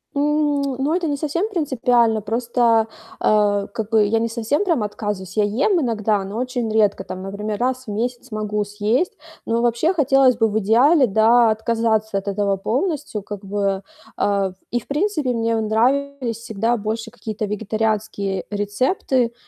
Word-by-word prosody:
М, 295 0 +1 0.2
ну, 290 +4 +1
это 350 -2 0
не 285 -1 -1
совсем 335 +8 -1
принципиально. 245 - +2
Просто, 235 +3 -2 0.6
э, 205 -1 +2
как 220 -1 -4
бы, 225 - +3
я 225 +2 +1
не 230 0 -1
совсем 235 - 0
прям 325 - +1
отказываюсь. 205 -1 -5
Я 210 - +4 0.2
ем 390 -5 +3
иногда, 215 -5 0
но 200 +3 -6
очень 250 -3 -2
редко. 210 -2 +2
Там, 185 0 -7
например, 205 +2 -4
раз 255 +1 -1
в - - -4
месяц 245 +4 -3
могу 210 -1 -1
съесть. 210 - 0 0.3
Но 230 +1 0
вообще 240 +9 +2
хотелось 270 -6 +4
бы 225 -1 +3
в 215 - -1
идеале, 255 - +4
да, 225 +3 +4
отказаться 220 -1 0
от 195 - -5
этого 200 0 0
полностью, 270 - -2
как 205 0 -8
бы. 195 -1 -1 0.4
Э, 200 -2 +1 0.2
и, 240 - +1
в - - -18
принципе, 305 -2 0
мне 230 0 0
нравились 245 +3 0
всегда 230 0 -1
больше 220 +2 -3
какие-то 215 -1 -5
вегетарианские 210 -1 -2
рецепты. 235 - 0
225 Hz, 160 wpm, -21 LUFS, 210-255 Hz, 0.6 s, Я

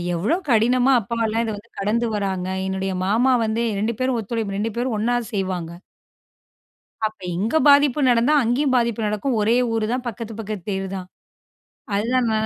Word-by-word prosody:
எவ்வளோ 200 - +1
கடினமா, 245 +3 +4
அப்பாலாம் 225 +1 -1
இத 225 - -2
வந்து 220 +3 -14
கடந்து 220 +4 0
வர்றாங்க. 190 -3 -2 0.2
என்னுடைய 190 0 -2
மாமா 230 +7 +3
வந்து 220 +2 -1 0.2
2 220 +3 -1
பேரும் 255 -1 +1
ஒத்துழைப்பு, 215 -2 -3
2 225 +2 -1
பேரும் 245 -1 -1
ஒண்ணா 240 +3 +1 0.2
செய்வாங்க. 185 -4 -2 1.4
அப்ப 215 0 -7 0.2
இங்க 215 - 0
பாதிப்பு 285 0 +5
நடந்தா 240 +4 +3
அங்கேயும் 255 +4 +1
பாதிப்பு 235 -2 0
நடக்கும். 215 +5 -1
ஒரே 220 +3 +3 0.2
ஊரு 225 -1 0
தான். 250 0 -2
பக்கத்து, 230 0 -6
பக்கத்து 210 -4 -6
தெரு 195 -1 -2
தான். 185 -1 -6 0.9
அதுதான் 240 +5 +1
நான் 220 0 +1
225 Hz, 160 wpm, -22 LUFS, 205-240 Hz, 1.4 s, பாதிப்பு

